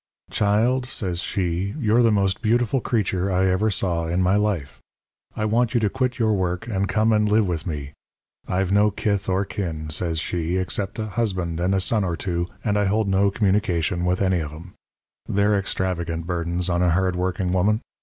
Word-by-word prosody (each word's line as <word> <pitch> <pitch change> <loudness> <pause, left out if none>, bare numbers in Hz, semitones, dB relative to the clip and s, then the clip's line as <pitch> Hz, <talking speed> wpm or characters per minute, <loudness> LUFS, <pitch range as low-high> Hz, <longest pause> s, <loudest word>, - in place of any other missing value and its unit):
"'Child,' 115 +5 +2
says 90 -8 -1
she, 95 +1 -2
'you're 115 -3 +3
the 115 -2 +4
most 100 -2 +1
beautiful 120 +2 +1
creature 100 -5 0
I 95 +1 +2
ever 95 +4 +2
saw 85 -5 -1
in 85 +2 0
my 90 +1 +3
life. 100 -9 -1 0.6
I 110 - -1
want 115 +3 +1
you - - +5
to 105 -3 0
quit 130 0 -1
your 110 -3 +2
work 90 -3 -1
and 100 -4 -1
come 110 +1 +2
and 105 -1 +2
live 105 -1 +3
with 85 -1 -3
me. 75 -3 -5 0.5
I've 95 +1 0
no 105 +1 +4
kith 100 -1 -1
or 95 +2 +1
kin,' 80 -6 -4
says 80 +1 -1
she, 85 +2 -2
'except 95 +2 -2
a 110 - -2
husband 95 -7 -2
and 90 +2 +1
a - - +2
son 105 +3 +1
or 85 -3 -2
two, 85 -2 -2 0.2
and 105 -1 +1
I 105 - +2
hold 105 +2 +1
no 95 +1 +3
communication 95 -4 0
with 90 +2 +1
any 95 -2 +2
of 75 -2 -4
'em. 85 +4 -11 0.6
They're 100 +1 +2
extravagant 85 -4 -2
burdens 85 0 -1
on 85 -1 +1
a 90 - +3
hard 90 +1 +1
working 90 0 -1
woman. 105 +5 +2
95 Hz, 195 wpm, -23 LUFS, 90-105 Hz, 0.6 s, you